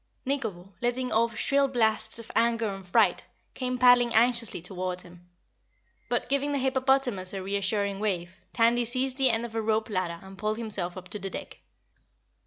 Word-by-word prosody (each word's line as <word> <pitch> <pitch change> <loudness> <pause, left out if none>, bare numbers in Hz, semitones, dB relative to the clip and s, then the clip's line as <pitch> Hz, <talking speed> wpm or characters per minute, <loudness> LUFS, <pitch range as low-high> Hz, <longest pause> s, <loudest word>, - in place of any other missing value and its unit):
Nikobo, 200 -9 -3
letting 245 +1 -1
off 230 +1 +1
shrill 280 0 +2
blasts 220 -4 +1
of 230 - -8
anger 230 -2 +2
and 195 -1 -10
fright, 180 - +3 0.3
came 255 -1 -2
paddling 245 -1 +5
anxiously 235 -2 +3
toward 180 +1 -4
him. 175 0 -16 0.8
But - - -1
giving 280 +1 0
the - - +1
hippopotamus 260 -7 +1
a 190 - -4
reassuring 200 0 -1
wave, 185 -4 -2 0.2
Tandy 235 +1 +3
seized 255 +2 -1
the 265 -1 +5
end 225 0 0
of 230 - -8
a 225 - -1
rope 220 0 0
ladder 185 -3 -1
and 190 0 -12
pulled 215 +1 -1
himself 200 -6 -1
up 185 -1 -9
to 210 - -6
the 195 0 -4
deck. - - -8
220 Hz, 175 wpm, -27 LUFS, 195-245 Hz, 0.8 s, paddling